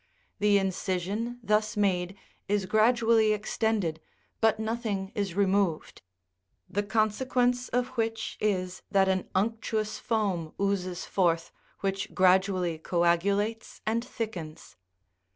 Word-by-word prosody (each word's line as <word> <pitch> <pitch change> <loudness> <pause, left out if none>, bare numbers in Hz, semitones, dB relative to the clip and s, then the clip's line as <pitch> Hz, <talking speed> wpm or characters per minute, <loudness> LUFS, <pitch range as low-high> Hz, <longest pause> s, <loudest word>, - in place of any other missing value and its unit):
The 205 -1 +4
incision 195 +4 -2
thus 215 +1 +1
made 190 -2 +1 0.3
is 205 -1 +1
gra 215 +4 +4
dually 225 -3 +3
extended, 210 -6 -1 0.4
but 220 -1 +3
nothing 220 -4 -2
is 200 -4 -2
removed; 195 -4 +1 0.7
the 205 - -1
consequence 245 +4 +1
of 250 +1 0
which 225 -3 -2
is, 185 -3 -1
that 195 -1 +3
an 190 -1 0
unctuous 215 +1 -1
foam 195 -8 -1
oozes 185 -3 -1
forth, 170 -3 +1 0.3
which 195 -1 -2
gradually 185 -2 +3
coagulates 200 +7 0
and 230 +2 0
thickens. 210 - -6
205 Hz, 110 wpm, -28 LUFS, 185-220 Hz, 0.7 s, The